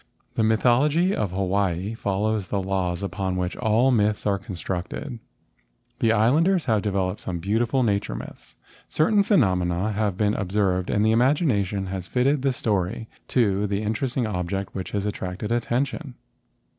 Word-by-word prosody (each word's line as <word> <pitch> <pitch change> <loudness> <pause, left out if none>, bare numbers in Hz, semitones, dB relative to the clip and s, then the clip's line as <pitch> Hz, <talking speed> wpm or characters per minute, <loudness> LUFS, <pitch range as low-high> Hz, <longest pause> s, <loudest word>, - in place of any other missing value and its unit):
The - - 0
mythology 135 - +3
of 105 - -1
Hawaii 95 +1 0
follows 105 -1 -1
the 100 - -1
laws 95 -1 -2
upon 95 -1 -2
which 90 0 -2
all 120 +3 +3
myths 105 -3 +1
are 100 -2 +1
constructed. 95 - -5 0.8
The 115 - +3
Islanders 155 - +3
have 110 -4 +2
developed 95 -3 -1
some 90 - -4
beautiful 115 +8 +1
nature 100 - 0
myths. - - -10 0.3
Certain 205 +7 +3
phenomena 95 - +2
have 105 -3 -1
been 105 -1 +2
observed 95 -2 0
and 105 0 +2
the 110 - +4
imagination 115 - +2
has 95 -1 -5
fitted 135 +3 +1
the 135 0 +2
story 105 -2 -2 0.2
to 105 -4 +1
the 100 +1 -2
interesting 120 +3 -1
object 95 -1 -3
which 95 - -5
has 100 -1 -2
at¬ 105 - 0
tracted 95 +4 -5
attention. 125 +4 -1
105 Hz, 150 wpm, -24 LUFS, 95-120 Hz, 0.8 s, the